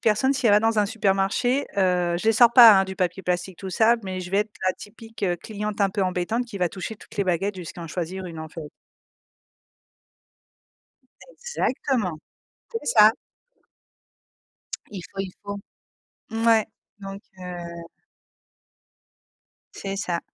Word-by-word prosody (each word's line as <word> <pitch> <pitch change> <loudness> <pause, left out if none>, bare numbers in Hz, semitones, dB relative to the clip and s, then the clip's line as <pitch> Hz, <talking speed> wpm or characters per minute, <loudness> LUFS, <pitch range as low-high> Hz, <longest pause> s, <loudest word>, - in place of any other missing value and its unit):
personne, 230 +5 +3
si 265 -3 0
elle 210 - +5
va 205 - +6
dans 225 0 +2
un 205 - +3
supermarché, 215 +5 +1
heu, 180 -3 +2
je - - -7
les 225 - +6
sors 235 +1 +6
pas, 235 -3 +10
hein, - - +1
du 190 0 -6
papier 185 +1 -1
plastique 180 0 -2
tout 190 -1 -6
ça, 225 +6 +4
mais 185 -1 -4
je 180 - -7
vais 195 - +2
être 210 +1 0 0.2
la 185 - +3
typique 225 +2 -9 0.2
cliente 210 -1 -5
un 200 -1 +3
peu 195 +1 -1
embêtante 185 +6 -1
qui 205 -4 -7
va 180 -1 +2
toucher 195 +5 -6
toutes - - -15
les 200 - +1
baguettes 190 +2 0
jusqu'à 175 0 -8
en - - -6
choisir 180 +3 -4
1 165 -2 -8
en 160 0 -6
fait. 160 -1 -8 2.6
Exactement. 260 - -2 0.5
C'est 455 - -3
ça. 215 -4 +6 1.8
Il 195 -3 -7
faut, 195 - -4
il 190 -2 -5
faut. 200 0 -5 0.7
Ouais, 225 -1 +3 0.3
donc 195 0 -7 0.2
heu 170 -2 -7 1.9
C'est 195 0 -5
ça, 175 -4 -2
195 Hz, 155 wpm, -24 LUFS, 180-220 Hz, 2.6 s, pas